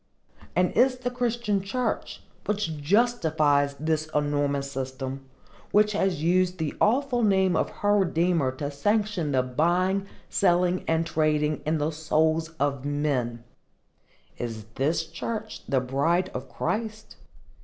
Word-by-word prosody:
And 180 0 +3
is 255 +2 +3
the 250 0 -3
Christian 235 -4 0
church, 250 +6 -3 0.2
which 205 -6 -1
justifies 155 -8 +2
this 155 +1 -1
enormous 145 -1 0
system,—which 135 +10 -2
has 190 -6 0
used 180 +2 +2
the 160 -3 -2
awful 250 +2 +2
name 190 -4 +3
of - - +1
her 205 0 +1
Redeemer 170 -6 +2
to 145 +2 -4
sanction 200 +1 0
the 130 -2 +2
buying, 180 +9 +1 0.2
selling 180 -1 +2
and 165 0 +1
trading 155 -2 +1
in 160 +1 +2
the 150 +1 0
souls 160 +1 +1
of 140 -2 0
men,—is 120 -4 -5
this 155 +6 0
church 215 +7 -5
the 135 0 +3
bride 150 +9 0
of - - -6
Christ? 220 0 -4
160 Hz, 125 wpm, -26 LUFS, 145-200 Hz, 0.2 s, And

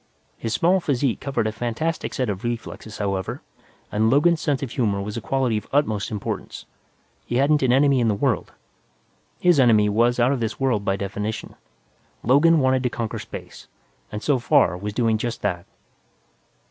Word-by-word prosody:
His 115 - -4
small 180 +3 +3
physique 140 -6 0
covered 135 -5 -2
a 110 - 0
fantastic 120 +9 -3
set 130 -2 0
of 100 -1 -4
reflexes, 115 -2 -5
however, 95 -2 -3 0.5
and 110 +1 +2
Logan's 155 +5 +3
sense 145 -3 0
of 130 - -5
humor 105 -6 0
was 105 +1 -5
a 115 - -4
quality 125 +1 0
of 105 - -18
utmost 110 -8 +1
importance. 105 -3 -5 0.6
He 120 - -2
hadn't 145 +3 +3
an 130 -2 +3
enemy 135 +1 +4
in 120 - +2
the 105 - +2
world. 125 -1 -1 0.9
His 175 -4 +4
enemy 110 -5 +5
was 120 +4 +2
out 120 +2 +4
of 140 - 0
this 115 -1 -3
world 125 -6 +1
by 100 -2 0
definition; 100 +2 -4 0.7
Logan 150 +6 +5
wanted 130 0 +2
to 125 - 0
conquer 115 -2 -4
space - - -10 0.4
and, 105 - -5
so 140 -4 +2
far, 125 - +3
was 100 +3 -5
doing 115 -2 +1
just 120 0 -4
that. 90 -4 -2
120 Hz, 175 wpm, -23 LUFS, 105-135 Hz, 0.9 s, enemy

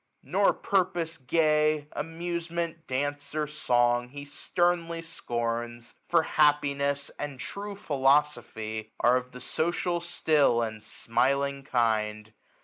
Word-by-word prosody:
Nor - - +3
purpose 175 -4 0
gay, 150 +1 +2
Amtisement, 170 0 -4
danc 145 +2 -3
e, - - -2
or 155 - +1
song, 120 -4 +1
he 145 +2 -8
sternly 170 +2 -1
scorns 120 -4 -4
j - - -33
For 170 -2 +4
happiness 140 -2 +2
and 145 -3 -5
true 200 +8 -6
philosophy 135 - 0
Are 120 +1 +5
of 125 0 -6
the 125 - -10
social 170 +4 -1
still, 155 -8 +2
and 110 -1 -5
smiling 140 +6 0
kind. 110 -4 0
145 Hz, 120 wpm, -28 LUFS, 120-165 Hz, -, Are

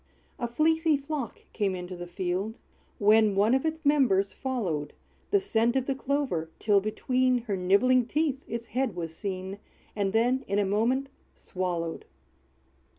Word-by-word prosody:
A 240 - -1
fleecy 320 +4 +2
flock 280 -4 -5
came 200 -4 0
into 180 0 -6
the 175 0 -7
field; 185 +5 -3 0.4
When 210 0 +4
one 210 +4 +4
of 265 +4 +2
its 320 0 -4
members 250 -10 +3
followed 180 - -3 0.4
The 405 - +4
scent 235 - +1
of 265 -1 +1
the 275 - 0
clover, 270 - -1
till 205 -2 +3
between 250 +4 +1
Her 210 -4 -2
nibbling 205 +7 +3
teeth 290 0 0
its 235 +1 -4
head 245 -3 -1
was 165 -2 -5
seen, 190 +1 -5 0.4
And 200 -2 0
then 245 +5 +2
in 200 - 0
a 205 - +2
moment 235 +7 +1 0.3
swallowed. 175 -3 -3
225 Hz, 155 wpm, -28 LUFS, 190-265 Hz, 0.4 s, When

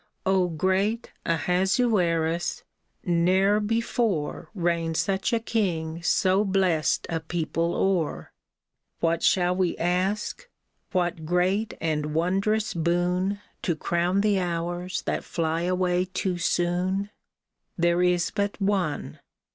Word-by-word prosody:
'' - - -47
O 190 -2 +3
great 190 +7 0 0.2
Ahasuerus! 175 -1 +1 0.4
ne'er 185 +4 +3
before 220 -6 -1
Reigned 170 -3 0
such 195 -1 0
a 230 - +2
king 170 -8 -1
so 190 +3 +3
blest 185 -6 +1
a 165 - -2
people 165 +1 -2
o'er! 180 -6 0 0.7
What 165 0 +1
shall 180 -1 +3
we 185 -2 0
ask? 185 - -1 0.4
What 175 -3 -1
great 185 +5 +1
and 150 -2 -1
wondrous 200 +6 +1
boon 180 +4 0 0.2
To 170 - 0
crown 175 +5 0
the 205 -2 +2
hours 175 +1 -3
that - - -2
fly 165 -1 -1
away 180 0 +1
too 185 -1 -2
soon? 180 +4 0 0.7
There 170 0 +2
is 180 -1 +2
but 205 -1 -2
one. 195 -7 -1
180 Hz, 115 wpm, -26 LUFS, 170-195 Hz, 0.7 s, O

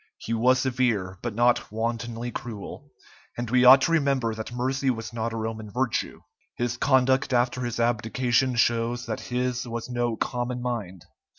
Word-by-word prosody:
He 115 - -4
was 125 +3 +4
severe, 120 -8 0
but 120 -3 -4
not 120 -1 +2
wantonly 115 +1 -3
cruel, 110 -5 -7 0.5
and 120 -1 -4
we 125 0 +4
ought 135 +2 +9
to 165 - +1
remember 140 -7 +1
that 110 +1 -6
mercy 130 +2 -1
was 115 -2 -3
not 115 0 -2
a 115 - -4
Roman 110 -1 -4
virtue. 125 +2 -2 0.3
His 120 0 -1
conduct 130 0 +2
after 125 +1 +1
his 120 -1 -3
abdication 120 +2 +1
shows 120 0 +1
that 110 -2 -3
his 125 0 -1
was 120 +1 -5
no 120 -1 0
common 125 +2 -2
mind. 110 -8 -4
120 Hz, 165 wpm, -26 LUFS, 115-125 Hz, 0.5 s, ought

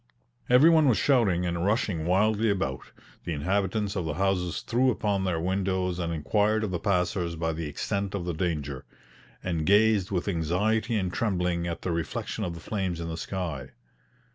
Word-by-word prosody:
Every 130 +7 +7
one 160 -3 +5
was 115 - +3
shouting 105 -11 +3
and 85 -1 -1
rushing 95 -5 0
wildly 105 +4 +2
about; 95 -10 -2 0.3
the 85 - -3
inhabitants 100 +6 -1
of 95 - -1
the 75 -2 -2
houses 90 -2 0
threw 125 +3 +2
open 100 -5 0
their 90 -3 0
windows 95 0 -1
and 85 -1 -2
inquired 105 +8 +1
of 105 - -2
the 90 - -2
passers 90 -2 0
by 80 0 -1
the 80 0 -4
extent 100 +6 -3
of 90 -3 -3
the 90 - -2
danger, 75 -6 -2 0.6
and 85 -4 -1
gazed 105 +1 +4
with 90 -1 -2
anxiety 100 +7 0
and 95 -4 -1
trembling 90 -5 0
at 85 - -5
the 90 - -1
reflection 85 0 -3
of 85 -2 -3
the - - -8
flames 95 -2 -3
in 85 -1 -4
the 80 - -4
sky. 80 -8 -5
90 Hz, 180 wpm, -27 LUFS, 85-105 Hz, 0.6 s, Every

